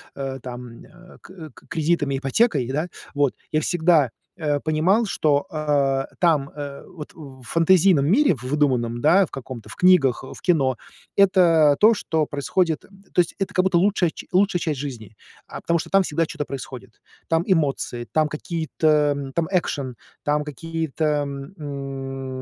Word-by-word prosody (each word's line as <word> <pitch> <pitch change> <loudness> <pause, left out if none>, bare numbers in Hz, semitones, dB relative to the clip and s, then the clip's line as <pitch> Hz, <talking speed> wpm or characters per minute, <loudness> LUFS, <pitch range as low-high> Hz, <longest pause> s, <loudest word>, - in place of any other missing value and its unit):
э, 135 -1 -5
там, 125 -1 -9
э, 180 +1 -17
к 170 -4 -11
к - - -19
кредитами, 155 -3 0
ипотекой, 140 - +1
да, 155 +6 -1 0.3
вот, 145 -2 +1 0.2
я 155 - +2
всегда, 160 -7 +2 0.3
э, 150 -3 0
понимал, 165 +10 +2
что, 145 -7 +1
э, 145 -4 0
там, 155 -5 +2
э, 145 -1 -8
вот, 150 -4 -10
в 135 -5 -12
фэнтезийном 165 +1 +4
мире, 215 - +4
в 125 - -13
выдуманном, 125 -4 0
да, 175 +8 +5
в - - -17
каком-то, 125 -4 -8
в - - -9
книгах, 180 -10 +4
э, - - -9
в - - -13
кино, 135 -8 +2 0.4
это, 170 -7 +5
то, 220 +2 +7
что 160 -6 -1
происходит, 160 +4 0 0.3
то 180 - +5
есть, 170 - -3
это 195 - -2
как 185 - +3
будто 190 -2 +2
лучшая 185 -1 +2
ч - - -11
лучшая 190 -1 +3
часть 155 -5 -2
жизни, 120 -7 -7 0.3
а, - - -8
потому 170 0 +1
что - - -6
там 195 0 +4
всегда 165 -1 0
чё-то 145 - -4
происходит. 130 -4 -9 0.3
Там 165 +1 +2
эмоции, 140 - 0
там 155 -1 +2
какие-то, 160 +1 -3 0.3
м, 135 -1 -6
там 165 +1 0
экшн, 145 -8 -1 0.3
там 150 0 +1
какие-то, 160 +1 -4
м, 145 +1 -2
м, 135 -3 -6
150 Hz, 170 wpm, -23 LUFS, 135-170 Hz, 0.4 s, то